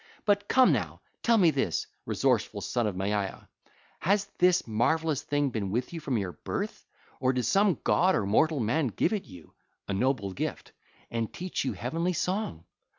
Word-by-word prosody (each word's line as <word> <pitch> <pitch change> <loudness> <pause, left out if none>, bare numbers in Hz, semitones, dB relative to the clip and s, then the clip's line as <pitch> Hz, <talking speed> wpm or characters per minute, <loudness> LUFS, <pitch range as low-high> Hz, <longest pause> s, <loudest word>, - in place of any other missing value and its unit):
But 205 -1 +2
come 255 -1 +5
now, - - -2 0.2
tell 230 -1 +4
me 175 -6 +5
this, 135 - -1 0.2
resourceful - - +1
son 120 -3 0
of 100 - -3
Maia: 100 +1 -2 0.6
has 200 +3 +2
this 180 0 +4
marvellous 145 +7 +1
thing 145 -2 0
been 105 -4 -2
with 120 - -2
you 165 - -4
from 140 -6 -1
your 95 -4 -2
birth, - - -5 0.3
or 130 0 +2
did 125 -1 0
some 200 -3 +3
god 185 +1 +3
or 100 - 0
mortal 150 +9 +3
man 130 +6 +1
give 120 - 0
it 205 - -2
you—a 90 +1 -11
noble 100 -2 0
gift—and 115 +4 -5
teach 180 +1 -3
you - - -1
heavenly 170 +3 -1
song? 180 - -2
140 Hz, 165 wpm, -28 LUFS, -, 0.6 s, come